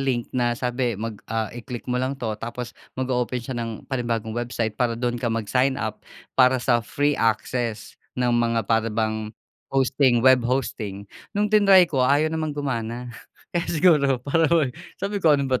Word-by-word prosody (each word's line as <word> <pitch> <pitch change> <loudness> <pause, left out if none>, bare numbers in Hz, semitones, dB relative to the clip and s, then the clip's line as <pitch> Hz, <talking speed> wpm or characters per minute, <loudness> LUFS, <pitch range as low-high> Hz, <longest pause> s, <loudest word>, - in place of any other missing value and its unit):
link 125 -4 0
na 120 -1 +1
sabi 125 -3 -1
mag, 110 0 -5
ah, 110 -1 -2
i-click 120 0 -7
mo 125 0 -1
lang 130 +2 -2
to 115 -4 -3
tapos 120 +1 -5 0.2
mag-oopen 125 -1 -1
siya 125 +2 -5
ng 115 -2 -5
panibagong 115 -4 -2
website 120 -1 -2
para 115 -2 +1
dun 120 0 -2
ka 120 - 0
mag-sign 125 +4 +1
up 110 -5 -4 0.3
para 130 0 +5
sa 120 -1 +2
free 145 +5 0
access 115 -1 -1 0.2
ng 125 -1 +1
mga 115 -1 +1
para 115 +2 +1
bang 110 0 -1 0.4
hosting 130 -2 +2
web, 130 -1 +7
hosting, 110 -6 -2 0.3
nung 205 0 +1
tinry 195 -3 +7
ko 140 -6 -1
ayaw 145 +5 +3
namang 155 -2 -2
gumana 120 -3 -3 0.4
kaya 175 -1 -1
siguro 150 -6 +4
para 160 +2 +2
bang 155 -7 +2 0.2
sabi 200 +1 -3
ko 155 -4 +5
ano 140 - -1
ba 130 -1 0
125 Hz, 175 wpm, -24 LUFS, 115-135 Hz, 0.4 s, web